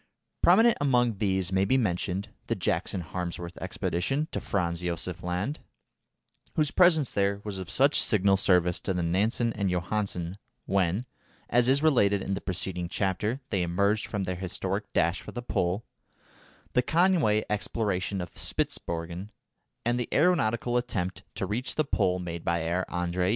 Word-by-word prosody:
Prominent 230 0 +5
among 120 -6 +2
these 95 -3 0
may 95 0 +3
be 130 +7 +3
mentioned 95 -2 -1 0.2
the - - 0
Jackson 95 - -1
Harmsworth 85 0 -5
expedition 135 - -1
to - - -2
Franz 85 -3 -1
Josef 90 +1 -3
Land 90 +11 -2 1.0
(whose 150 -2 +2
presence 160 -7 +4
there 100 0 +1
was 100 -3 -5
of 95 -1 -6
such 140 +7 +3
signal 100 -2 +3
service 90 -2 +3
to 95 - -2
Nansen 100 +7 +1
and 100 -2 -1
Johansen 90 0 -2 0.3
when, 95 +4 +1 0.5
as 120 +1 +4
is 140 +3 +3
related 100 -10 +3
in 100 - -2
the 95 - -3
preceding 90 -1 -3
chapter, 105 +8 -1
they 95 -4 +1
emerged 100 +5 +1
from 105 -2 -2
their 90 -1 -3
historic 95 +2 -3
dash 85 +2 +1
for - - -9
the 120 - -5
Pole), 95 -1 -1 0.9
the 125 - +4
Conway 160 - +3
exploration 100 -3 -1
of 90 - -7
Spitzbergen, 85 +4 -3 0.6
and 120 +1 +1
the 120 - -3
aeronautical 125 -8 +2
attempt 95 -7 -2
to - - -2
reach 110 +7 -2
the 155 - +1
Pole 90 -8 +1
made 85 -2 -5
by 85 0 +1
Herr 85 +3 -1
Andrée. 90 +1 0
95 Hz, 155 wpm, -28 LUFS, 90-120 Hz, 1.0 s, Prominent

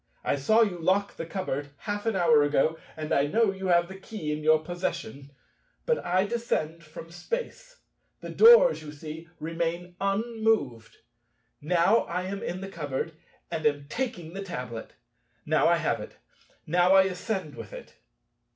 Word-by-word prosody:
I - - +1
saw 215 +12 +3
you 185 -5 -2
lock 190 +4 +1
the 165 - -6
cupboard 145 -7 -3
half 205 +1 -4
an 225 - +1
hour 165 -5 +5
ago, 145 +2 +2 0.2
and 155 -1 -3
I 140 +1 +3
know 220 +5 +2
you 190 0 -5
have 175 -1 +4
the 190 +1 -10
key 190 -6 -5
in 150 0 -3
your 155 +1 +6
possession. 170 -6 -4 0.6
But 475 -1 +1
I 185 +2 +2
descend 170 -8 -2
from 160 +1 -11
Space; - - -6 0.4
the - - -8
doors, 475 +2 +7
you 150 - -8
see, 155 +2 -9
remain 170 +2 -3
unmoved. 205 - 0 0.6
Now 175 +8 +3
I 180 +1 -3
am 195 +2 -4
in 180 +2 -4
the 195 - -5
cupboard 150 -3 -4 0.4
and 160 -2 -3
am 145 -1 -1
taking 220 -8 -4
the 195 - -5
tablet. 125 -11 -6 0.5
Now - - +3
I - - +4
have - - 0
it. - - -10 0.5
Now 175 +4 +4
I 190 - +8
ascend 190 -3 -3
with - - -9
it. - - -10
175 Hz, 165 wpm, -27 LUFS, 155-200 Hz, 0.6 s, I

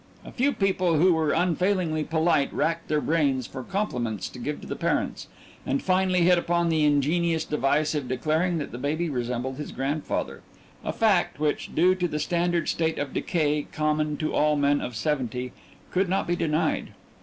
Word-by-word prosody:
A - - -9
few 270 +3 +1
people 185 - +1
who 180 +3 +5
were 160 -2 +1
unfailingly 180 -2 +1
polite 160 -2 +1
racked 165 0 -1
their 150 - +1
brains 140 -6 +1
for 130 - -7
compliments 125 - -2
to 125 - -11
give 145 +4 -3
to - - -10
the - - -4
parents - - -1 0.4
and 140 - 0
finally 185 -1 +2
hit 175 0 +5
upon 170 0 +1
the 160 -2 +2
ingenious 160 +3 +2
device 150 +1 +1
of 145 -4 -2
declaring 160 +7 0
that 150 - -4
the 120 - -7
baby 155 +4 -1
resembled 125 +1 -3
his 150 - -6
grandfather, 140 +3 -3 0.4
a - - -2
fact 200 -9 +2
which, 150 -1 -1
due 180 +3 +5
to 180 -1 -1
the 150 - -3
standard 170 +1 0
state 160 -1 0
of 145 -2 -3
decay 150 -4 0
common 155 -1 0
to 155 - -2
all 150 0 +3
men 145 0 +2
of 125 - -5
seventy, 125 -3 -2 0.4
could 185 0 +1
not 190 - +1
be 175 - 0
denied. 160 -1 -1
155 Hz, 180 wpm, -26 LUFS, 145-175 Hz, 0.4 s, who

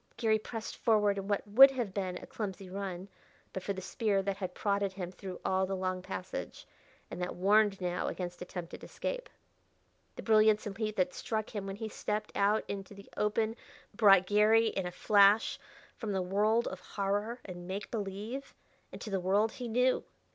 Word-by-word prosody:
Garry 220 -2 +2
pressed 225 +1 -6
forward 210 -3 +3
in 195 - -6
what 205 0 -1
would 260 +7 +9
have 245 -7 -3
been 185 -2 -2
a - - -9
clumsy 195 -3 -5
run, 190 -1 -5 0.5
but 190 - -4
for 200 - -3
the 190 -1 -5
spear 200 -2 0
that 195 0 -2
had 190 -2 -5
prodded 200 -2 0
him 180 -2 -5
through 185 -1 -8
all 190 0 +2
the 195 - -2
long 185 -1 -2
passage, 185 0 -6 0.5
and 180 - -5
that 180 - -3
warned 200 +2 +3
now 180 -1 -2
against 175 -1 -5
attempted 180 -1 -7
escape. - - -4 0.9
The - - -7
brilliance 215 -1 +4
and 200 -2 -5
heat 215 0 -2
that 180 -2 +1
struck 220 -1 -3
him 200 -1 -3
when 195 - -4
he 220 +2 -5
stepped, 210 0 -3
out 205 +2 +2
into 200 0 -6
the 200 0 -13
open 220 +1 0 0.4
brought 195 -3 +6
Garry 215 +3 +4
in 190 -3 -2
a - - -5
flash 205 +3 +4 0.4
from 215 -3 -4
the 190 - 0
world 210 +5 +2
of 190 - -7
horror 205 +5 -2
and 175 -2 -8
make 195 +3 -5
believe 215 +5 -5 0.4
into 215 - -7
the 195 - +1
world 200 +5 +2
he 245 +1 -6
knew. 250 +3 +2
200 Hz, 185 wpm, -32 LUFS, 190-215 Hz, 0.9 s, would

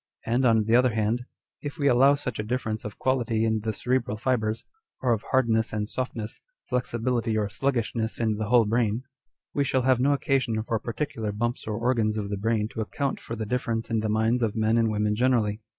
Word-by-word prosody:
And, 120 +3 +1
on 115 -2 +4
the 110 +2 +3
other 125 -2 +4
hand, 110 +3 0 0.4
if 145 +1 -6
we 140 -3 +1
allow 135 +2 +6
such 125 -6 -4
a - - 0
difference 110 -1 -2
of 105 - -7
quality 120 -4 +1
in 110 -1 +1
the 110 +1 -2
cerebral 120 0 -1
fibres, 110 -2 -1 0.3
or 125 -2 +2
of 110 - -2
hardness 115 -4 +2
and 105 -1 -1
softness, 115 -3 -4 0.3
flexibility 120 -2 0
or 105 -1 0
sluggishness 115 -1 -1
in 110 -2 +1
the 110 -1 -3
whole 120 -2 +5
brain, 115 +1 +1 0.5
we 145 - +2
shall 130 -2 +1
have 130 -1 +3
no 140 +3 +3
occasion 135 -6 0
for 115 0 -1
particular 115 -2 -3
bumps 120 +3 -2
or 105 -1 -2
organs 115 -2 +1
of 100 -1 -3
the 100 - -1
brain 110 +1 0
to 110 - -4
account 135 +5 -2
for 115 - -6
the 110 -1 -4
difference 115 0 -2
in 115 - +2
the 110 0 -1
minds 110 +3 +2
of 110 -3 0
men 110 0 +2
and 115 -1 +3
women 105 0 0
generally. 115 -3 +1
115 Hz, 210 wpm, -26 LUFS, 110-125 Hz, 0.5 s, allow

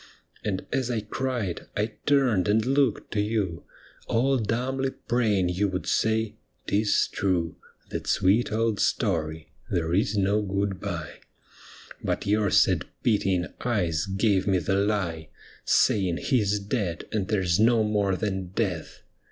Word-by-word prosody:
And 95 -3 -2
as 130 -2 0
I 115 -3 -1
cried 115 -4 -3
I 105 +1 -1
turned 130 -11 +3
and 110 +2 +2
looked 135 -3 +1
to 105 - +1
you, 105 -6 -2 0.4
All 130 +3 +2
dumbly 130 +5 -1
praying 110 -8 0
you 95 +3 +1
would 95 -1 -3
say, 110 -1 0
" - - -44
'Tis 105 +1 +2
true. 90 -4 -1 0.4
That - - -4
sweet 105 +7 +2
old 110 -2 0
story. 80 -7 -1 0.2
There 85 -1 -1
is 105 +3 +1
no 100 +2 +2
good 100 -1 -2
bye." 85 -6 -5 0.8
But - - -1
your 105 0 +2
sad - - +3 0.2
pitying 95 -5 +2 0.2
eyes 90 -8 0
gave 95 0 +1
me 95 -2 +3
the 90 +2 -1
lie. 95 -6 0 0.4
Saying 95 -4 +3
he 125 -5 +1
's 105 +1 +1
dead, 100 -4 -3
and 100 -4 -1
there 100 -3 0
's 85 +1 +2
no 115 0 +4
more 105 -3 +1
than 95 -1 -2
death. 90 -8 -2
105 Hz, 150 wpm, -26 LUFS, 95-110 Hz, 0.8 s, no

